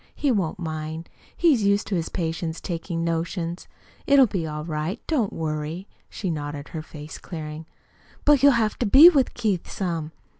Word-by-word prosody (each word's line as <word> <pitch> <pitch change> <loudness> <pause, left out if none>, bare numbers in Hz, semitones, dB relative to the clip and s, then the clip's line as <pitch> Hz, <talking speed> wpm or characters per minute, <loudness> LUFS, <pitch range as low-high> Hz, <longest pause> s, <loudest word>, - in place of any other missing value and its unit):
He 285 - +1
won't 190 -9 0
mind. 160 -1 -5 0.3
He's 310 -9 +4
used 200 0 +2
to 200 - -2
his 165 -2 -2
patients 165 -1 -3
taking 170 -1 -4
notions. 170 +1 -3 0.4
It'll 280 -2 +7
be 185 -7 -3
all 150 0 -5
right. 160 +5 -3
Don't 255 -11 0
worry," 160 +3 -4 0.2
she 190 -4 -3
nodded, 145 -2 -5
her 160 - -5
face 155 0 -10
clearing. 155 -2 -7 0.6
"But 290 -3 +5
you'll 280 -1 +7
have 220 -3 0
to 240 - +1
be 280 +11 +10
with 280 -7 +1
Keith 210 -7 -1
some." 165 -5 -3
170 Hz, 165 wpm, -24 LUFS, 160-215 Hz, 0.6 s, be